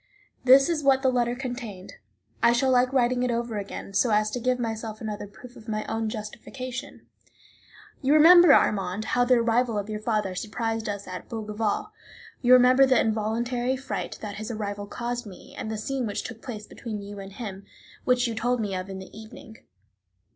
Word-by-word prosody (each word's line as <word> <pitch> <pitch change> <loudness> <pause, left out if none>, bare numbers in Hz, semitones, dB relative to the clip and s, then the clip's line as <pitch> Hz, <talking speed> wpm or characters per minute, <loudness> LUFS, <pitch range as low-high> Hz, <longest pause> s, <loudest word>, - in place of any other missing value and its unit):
This 265 +2 +7
is 330 -3 0
what 270 -1 +4
the 260 - +4
letter 240 -1 +1
contained; 240 -7 -6 0.5
I 235 - +5
shall 260 +2 +2
like 250 0 +3
writing 250 -1 +2
it 250 - +1
over 235 -2 -2
again, 195 0 -7
so 235 +5 +3
as 215 0 +2
to 245 - -3
give 250 +1 +1
myself 225 -2 -4
another 210 -2 -5
proof 245 +5 -14
of 220 - -14
my 215 -1 -2
own 225 0 -2
justification. 240 +4 -7 1.0
You 275 +1 +3
remember, 345 +1 +8
Armand, 195 -3 +2
how 245 -1 +3
the 250 +1 +5
arrival 235 -1 +1
of 205 +1 -3
your 210 - -3
father 215 -3 -1
surprised 225 +3 -3
us 200 -1 -5
at 185 0 -8
Bougival; 220 - -2 0.5
you 250 -2 +3
remember 255 +2 +6
the 260 -3 +4
involuntary 235 +4 0
fright 265 - -5
that 205 -2 -5
his 215 +2 -6
arrival 205 -2 -4
caused 240 +1 -4
me, 185 -3 -13
and 220 - -5
the 220 - -3
scene 255 +2 -2
which 205 - -3
took 225 -2 -8
place 215 -4 -7
between 210 -3 -7
you 205 0 -8
and 195 0 -9
him, 200 -4 -7 0.4
which 250 0 +2
you 230 - -3
told 240 +2 0
me 205 -3 -2
of 185 +1 -4
in 190 - -6
the 190 +1 -11
evening. 220 0 -12
225 Hz, 190 wpm, -26 LUFS, 210-250 Hz, 1.0 s, remember